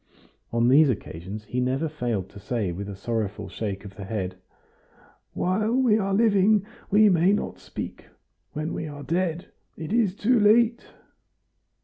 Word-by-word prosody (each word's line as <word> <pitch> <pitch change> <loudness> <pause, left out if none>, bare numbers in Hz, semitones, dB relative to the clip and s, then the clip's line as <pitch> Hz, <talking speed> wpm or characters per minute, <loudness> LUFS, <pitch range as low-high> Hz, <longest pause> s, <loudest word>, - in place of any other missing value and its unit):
On 115 0 +2
these 140 +3 +6
occasions 100 -2 -5
he 125 - -3
never 130 +5 0
failed 120 - -3
to 100 - -12
say 105 -2 -2
with 100 +4 -6
a 100 - -6
sorrowful 105 -1 -3
shake 100 0 -5
of 100 -1 -10
the 100 - -6
head, 95 -2 -3 1.0
"While 210 +5 0
we 245 -5 +3
are 195 -1 -1
living 205 -1 +4 0.2
we 210 +1 +6
may 180 0 +4
not 210 - -3
speak, - - -7 0.5
when 155 0 -3
we 160 - -4
are 145 -1 -8
dead 170 +1 -2 0.3
it 160 +5 -5
is 220 -6 +2
too 235 +4 +2
late!" 230 +3 +4
155 Hz, 155 wpm, -25 LUFS, -, 1.0 s, these